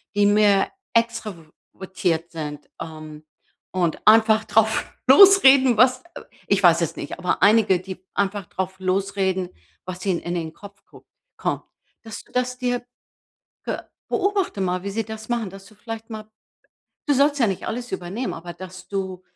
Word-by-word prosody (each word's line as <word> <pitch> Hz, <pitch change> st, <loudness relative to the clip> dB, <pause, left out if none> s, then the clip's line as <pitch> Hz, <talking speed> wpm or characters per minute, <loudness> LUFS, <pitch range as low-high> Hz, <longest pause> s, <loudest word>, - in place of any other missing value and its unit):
die 205 Hz, 0 st, +3 dB
mehr 205 Hz, -1 st, +3 dB, 0.2 s
extrovertiert 190 Hz, -5 st, -3 dB
sind, 150 Hz, -3 st, -7 dB
ähm, 155 Hz, -1 st, -9 dB, 0.5 s
und 175 Hz, -3 st, -1 dB
einfach 220 Hz, 0 st, +5 dB
drauf 220 Hz, +1 st, +1 dB
losreden, 270 Hz, -, +7 dB
was, 255 Hz, +2 st, +4 dB
äh -, -, -9 dB, 0.2 s
ich 200 Hz, 0 st, +1 dB
weiß 170 Hz, -2 st, +6 dB
jetzt 170 Hz, -3 st, -2 dB
nicht, 145 Hz, -, -6 dB
aber 180 Hz, -1 st, -1 dB
einige, 205 Hz, -3 st, +5 dB
die 185 Hz, -1 st, -9 dB
einfach 200 Hz, 0 st, -1 dB
drauf 190 Hz, 0 st, -5 dB
losreden, 190 Hz, -1 st, -1 dB, 0.4 s
was 185 Hz, 0 st, -6 dB
ihnen 185 Hz, -4 st, +1 dB
in 175 Hz, -, -4 dB
den 160 Hz, -2 st, -4 dB
Kopf 200 Hz, +1 st, -14 dB
guckt -, -, -18 dB, 0.3 s
kommt. -, -, -2 dB, 0.4 s
Das, 225 Hz, -1 st, -8 dB
das 250 Hz, 0 st, -1 dB
dir 245 Hz, -1 st, -2 dB, 0.8 s
ge -, -, -3 dB, 0.3 s
beobachte 395 Hz, -, -1 dB
mal, 180 Hz, -1 st, -1 dB
wie 200 Hz, -, -3 dB
sie 225 Hz, +3 st, -2 dB
das 220 Hz, +1 st, -9 dB
machen, 235 Hz, -4 st, -1 dB
dass 195 Hz, 0 st, -12 dB
du 215 Hz, -, -18 dB
vielleicht 225 Hz, +1 st, -8 dB
mal 215 Hz, -1 st, -8 dB, 0.8 s
du 290 Hz, -, +3 dB
sollst 285 Hz, +2 st, +3 dB
ja 235 Hz, -, +4 dB
nicht 195 Hz, -3 st, -3 dB
alles 245 Hz, +2 st, -5 dB
übernehmen, 195 Hz, +9 st, -4 dB
aber 175 Hz, +1 st, -8 dB
dass 185 Hz, +1 st, -11 dB
du 190 Hz, -2 st, -4 dB
200 Hz, 160 wpm, -22 LUFS, 185-225 Hz, 0.8 s, losreden